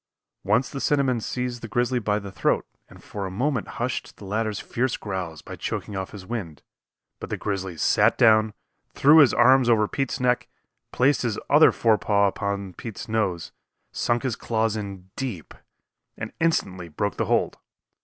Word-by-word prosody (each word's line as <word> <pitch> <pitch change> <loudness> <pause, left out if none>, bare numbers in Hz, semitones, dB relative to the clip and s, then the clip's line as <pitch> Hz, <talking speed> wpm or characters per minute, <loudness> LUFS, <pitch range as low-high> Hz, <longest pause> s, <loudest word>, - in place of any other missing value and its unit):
Once 110 +6 +2
the 135 - -5
cinnamon 135 -4 +2
seized 125 +1 -3
the 115 - -6
grizzly 120 +3 0
by 105 -2 0
the 100 -2 -7
throat - - 0 0.2
and - - -16
for 100 -2 -5
a - - -5
moment 125 +5 -1
hushed 120 +1 -3
the 100 - -11
latter's 110 +1 -2
fierce 125 +1 -2
growls 95 -6 -5
by - - -8
choking 105 - -4
off 95 -1 -4
his 100 -3 -10
wind, 95 -9 -6 0.6
but - - -7
the - - -2
grizzly 95 -4 -4
sat - - +3
down, 110 -1 +5 0.4
threw 150 +3 +7
his 145 -5 +7
arm 130 +2 +5
over 110 -2 +4
Pete's 135 +3 -2
neck, 125 -1 +1 0.4
placed 135 +3 +2
his 115 -4 -1
other 150 +2 +7
forepaw 105 -2 +2
upon 100 -1 -3
Pete's 115 +5 -8
nose, 105 -6 -1 0.4
sunk 120 0 0
his 130 -4 -1
claws 110 -2 -1
in 100 -3 -7
deep, 115 - -5 0.6
and 110 0 -6
instantly 95 - 0
broke 100 +6 -3
the - - 0
hold. - - 0
110 Hz, 170 wpm, -24 LUFS, 100-125 Hz, 0.6 s, threw